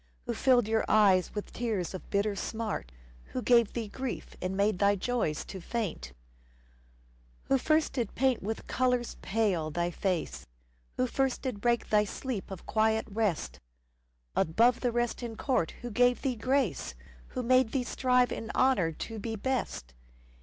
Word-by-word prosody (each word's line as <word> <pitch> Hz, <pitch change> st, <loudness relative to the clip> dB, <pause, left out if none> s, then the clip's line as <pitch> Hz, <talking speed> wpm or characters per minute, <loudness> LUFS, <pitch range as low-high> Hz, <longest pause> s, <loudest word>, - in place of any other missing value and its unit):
Who -, -, -2 dB
filled 250 Hz, -4 st, +3 dB
your 220 Hz, 0 st, +2 dB
eyes 195 Hz, -4 st, +4 dB
with 210 Hz, -, -5 dB
tears 215 Hz, -8 st, -2 dB
of 185 Hz, -, -8 dB
bitter 200 Hz, 0 st, +1 dB
smart? 215 Hz, -, -4 dB, 0.4 s
Who 255 Hz, -, -1 dB
gave 235 Hz, -3 st, +4 dB
thee 230 Hz, -2 st, -3 dB
grief 260 Hz, +4 st, -5 dB
and 185 Hz, +1 st, -2 dB
made 200 Hz, -2 st, +2 dB
thy 200 Hz, 0 st, +4 dB
joys 200 Hz, -7 st, -1 dB
to 190 Hz, -, -8 dB
faint? 170 Hz, -, -3 dB, 1.4 s
Who 270 Hz, -, +4 dB
first 310 Hz, +3 st, +2 dB
did 235 Hz, -6 st, -2 dB
paint 260 Hz, -1 st, +2 dB
with 220 Hz, +3 st, -4 dB
colours 250 Hz, -1 st, 0 dB
pale 195 Hz, -7 st, 0 dB
thy 175 Hz, +3 st, -1 dB
face? 170 Hz, -, -2 dB, 0.5 s
Who 255 Hz, -, +2 dB
first 265 Hz, 0 st, -1 dB
did 250 Hz, -7 st, -3 dB
break 235 Hz, 0 st, +1 dB
thy 210 Hz, 0 st, +4 dB
sleeps 220 Hz, -1 st, -5 dB
of 190 Hz, -, -8 dB
quiet 220 Hz, 0 st, +2 dB
rest? 195 Hz, -, -1 dB, 0.8 s
Above 230 Hz, +9 st, +3 dB
the 245 Hz, -, 0 dB
rest 240 Hz, +1 st, -1 dB
in 235 Hz, -2 st, -5 dB
court 235 Hz, -, 0 dB
who 240 Hz, -, -4 dB
gave 245 Hz, +3 st, +3 dB
thee 265 Hz, -3 st, 0 dB
grace? 230 Hz, -, 0 dB, 0.4 s
Who 250 Hz, -, 0 dB
made 255 Hz, -1 st, +4 dB
thee 265 Hz, -, 0 dB
strive 250 Hz, 0 st, +2 dB
in 225 Hz, -, -5 dB
honour 225 Hz, -11 st, +3 dB
to 225 Hz, +7 st, -6 dB
be 225 Hz, +1 st, -4 dB
best 220 Hz, -, -3 dB
225 Hz, 160 wpm, -30 LUFS, 195-250 Hz, 1.4 s, eyes